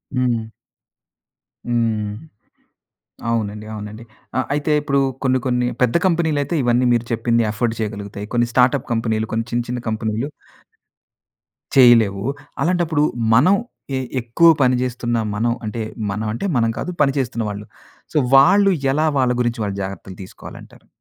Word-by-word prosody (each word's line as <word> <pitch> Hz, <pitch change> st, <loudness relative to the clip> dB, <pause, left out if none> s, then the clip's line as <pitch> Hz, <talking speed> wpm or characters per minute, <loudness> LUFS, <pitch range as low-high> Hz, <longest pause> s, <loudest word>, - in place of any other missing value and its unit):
హ్మ్. 120 Hz, -3 st, 0 dB, 1.2 s
హ్మ్. 115 Hz, -3 st, 0 dB, 1.2 s
అవునండి. 105 Hz, -2 st, -2 dB
అవునండి. 105 Hz, +2 st, -8 dB, 0.3 s
ఆ! -, -, +3 dB
అయితే 150 Hz, +1 st, 0 dB
ఇప్పుడు 140 Hz, -1 st, +1 dB, 0.2 s
కొన్ని 130 Hz, 0 st, +3 dB
కొన్ని 125 Hz, -1 st, +1 dB, 0.2 s
పెద్ద 125 Hz, +5 st, +3 dB
కంపెనీలయితే 160 Hz, -3 st, 0 dB
ఇవన్నీ 120 Hz, +1 st, +2 dB
మీరు 120 Hz, -1 st, +1 dB
చెప్పింది 115 Hz, +1 st, +1 dB
అఫోర్డ్ 110 Hz, +2 st, -1 dB
చేయగలుగుతాయి. 105 Hz, -1 st, -5 dB
కొన్ని 120 Hz, 0 st, +3 dB
స్టార్ట్‌అప్ 125 Hz, +2 st, +2 dB
కంపెనీలు 110 Hz, -1 st, -1 dB
కొన్ని 115 Hz, +1 st, -1 dB
చిన్న 120 Hz, 0 st, 0 dB
చిన్న 125 Hz, 0 st, -3 dB
కంపెనీలు... 110 Hz, +5 st, -2 dB, 1.5 s
చేయలేవు. 115 Hz, -6 st, +5 dB, 0.4 s
అలాంటప్పుడు 170 Hz, -3 st, +1 dB, 0.3 s
మనం 155 Hz, +12 st, +5 dB, 0.4 s
ఎ -, -, 0 dB, 0.2 s
ఎక్కువ 120 Hz, +9 st, +3 dB
పని 125 Hz, -1 st, +4 dB
జేస్తున్న 120 Hz, -1 st, -2 dB, 0.2 s
మనం 115 Hz, +2 st, +1 dB
అంటే, 110 Hz, +2 st, -4 dB, 0.3 s
మనం 110 Hz, +2 st, -3 dB
అంటే 120 Hz, -, -4 dB
మనం 115 Hz, -1 st, +2 dB
కాదు 180 Hz, -, -3 dB
పనిచేస్తున్న 130 Hz, -5 st, 0 dB
వాళ్ళు. 105 Hz, +1 st, -6 dB, 0.5 s
సో -, -, +1 dB, 0.2 s
వాళ్ళు 195 Hz, +9 st, +6 dB, 0.2 s
ఎలా 155 Hz, +2 st, +2 dB
వాళ్ళ 125 Hz, -1 st, +2 dB
గురించి 120 Hz, -1 st, -1 dB, 0.2 s
జాగ్రత్తలు 95 Hz, -1 st, -7 dB
తీసుకోవాలంటారు? -, -, -13 dB
120 Hz, 130 wpm, -20 LUFS, 110-130 Hz, 1.5 s, వాళ్ళు